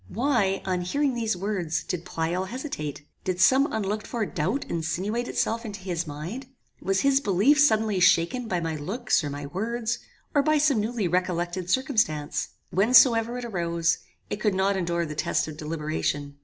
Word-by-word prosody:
Why, 215 - +1
on 185 -1 0
hearing 275 +10 0
these 225 -5 -1
words, 180 -4 -2
did 175 -2 -4
Pleyel 170 +3 -2
hesitate? 185 - -5 0.2
Did 185 -1 -2
some 265 +8 +5
unlooked 215 0 -2
for 230 -3 -2
doubt 190 - -2
insinuate 185 +9 -2
itself 230 +1 -1
into 210 -3 -6
his 175 -2 -3
mind? 170 - -6 0.3
Was 195 +1 +1
his 275 0 +3
belief 215 +8 +3
suddenly 220 -8 +3
shaken 175 +7 +3
by 180 -4 0
my 165 -1 -2
looks, 195 - 0
or 145 - -2
my 145 0 -5
words, 225 +8 -2 0.3
or 290 - +4
by 310 +2 +3
some 290 -5 +3
newly 220 -2 -1
recollected 180 0 -1
circumstance? 215 - 0 0.2
Whencesoever 230 +3 +5
it 245 - -5
arose, 170 -5 0 0.3
it - - -3
could 210 -2 +1
not 195 +1 +2
endure 170 -2 -1
the 150 - -5
test 150 - 0
of 155 - -7
deliberation. 150 -2 -3
195 Hz, 170 wpm, -26 LUFS, 170-235 Hz, 0.3 s, some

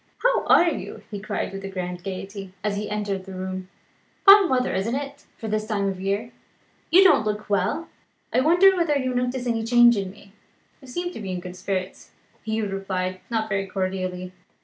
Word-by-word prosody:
"How - - +3
are 345 - +6
you?" 220 -7 -7
he 205 - -4
cried 195 - -3
with 195 0 -6
a 195 - -5
grand 180 -2 -5
gaiety, 195 0 -6
as 210 -1 0
he 205 +1 -3
entered 205 -2 -3
the 190 -1 -8
room. 185 0 -5 0.6
"Fine 395 -1 +9
weather, 255 -1 +1
isn't 200 +6 -1
it, 280 +1 -6
for 225 - -6
the 215 0 0
time 215 -2 -1
of 190 -1 -3
year? 200 +4 -2 0.6
You 375 +3 +7
don't 375 - +5
look 210 0 -3
well. 200 - 0 0.5
I - - +4
wonder 350 +7 +5
whether 335 -5 +2
you 260 -2 -1
notice 250 0 -1
any 230 -2 0
change 240 +1 +6
in 195 -2 -2
me? 200 0 -16 0.5
"You 265 - -14
seem 350 +7 -3
to - - -7
be 195 -3 -5
in 180 - -3
good 180 0 -8
spirits," 185 0 -4 0.3
Hugh 220 -1 -1
replied, 185 -1 -3
not 220 -2 -1
very 195 -1 -1
cordially. 185 -1 -3
210 Hz, 195 wpm, -24 LUFS, 190-250 Hz, 0.6 s, Fine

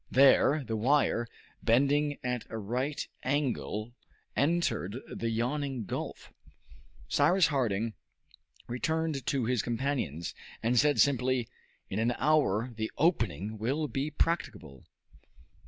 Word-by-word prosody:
There 140 +2 +5
the 115 -2 -3
wire, 120 0 +2 0.3
bending 140 +5 +3
at 125 -2 -2
a 110 - -5
right 125 +7 -2
angle, 125 -5 -1 0.4
entered 140 - +1 0.2
the 115 - -2
yawning 125 +1 -1
gulf. - - -6 0.7
Cyrus 170 +5 +4
Harding 115 -6 0 0.7
returned 160 +3 -1
to 135 -4 +1
his 125 -2 +1
companions, 115 - -2 0.3
and 120 +1 +3
said 145 +2 +3
simply, 130 -3 +2 0.4
"In 95 - -3
an 120 +2 +1
hour 130 -6 +2
the 110 0 -2
opening 110 - 0
will 140 +8 0
be 140 +2 -2
practicable." 90 - -2
125 Hz, 110 wpm, -30 LUFS, 110-145 Hz, 0.7 s, There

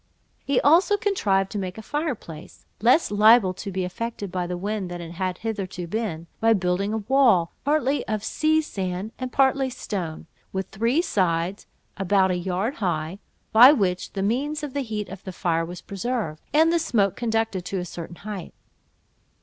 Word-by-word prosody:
He 275 -2 +2
also 355 +8 +5
contrived 200 - +1
to 210 - -3
make 185 0 -5
a 220 - -8
fire 295 0 -1
place, 160 -6 -12 0.2
less 245 +3 +4
liable 210 -2 +6
to 195 +2 -6
be 185 0 -2
affected 205 +1 -4
by 180 -1 -2
the 180 0 -3
wind 200 0 -3
than 175 0 -6
it 170 -1 -7
had 180 +1 -3
hitherto 195 -5 -4
been, 170 -4 -3
by 225 0 +4
building 190 +1 0
a 220 - 0
wall, 240 -11 +4
partly 290 -1 +1
of 215 -1 -2
sea 315 +6 +2
sand 190 -4 -4
and 255 -1 -4
partly 270 0 +3
stone, 180 -10 -5 0.3
with 190 -1 -3
three 235 - +1
sides 180 - 0 0.3
about 195 0 +3
a - - +1
yard 190 - -2
high, 175 -2 -2 0.3
by 245 +5 +10
which 190 -10 0
means 260 +10 -1
the 285 -1 -3
heat 215 -4 -4
of 195 0 -10
the 190 - -6
fire 170 -2 0
was 175 +2 -7
preserved, 200 -6 -3
and 320 +2 +4
the 340 - +3
smoke 215 - +1
conducted 225 -5 -1
to 195 - -3
a 180 - -3
certain 170 0 -8
height. 200 -2 -7
200 Hz, 175 wpm, -24 LUFS, 180-245 Hz, 0.3 s, by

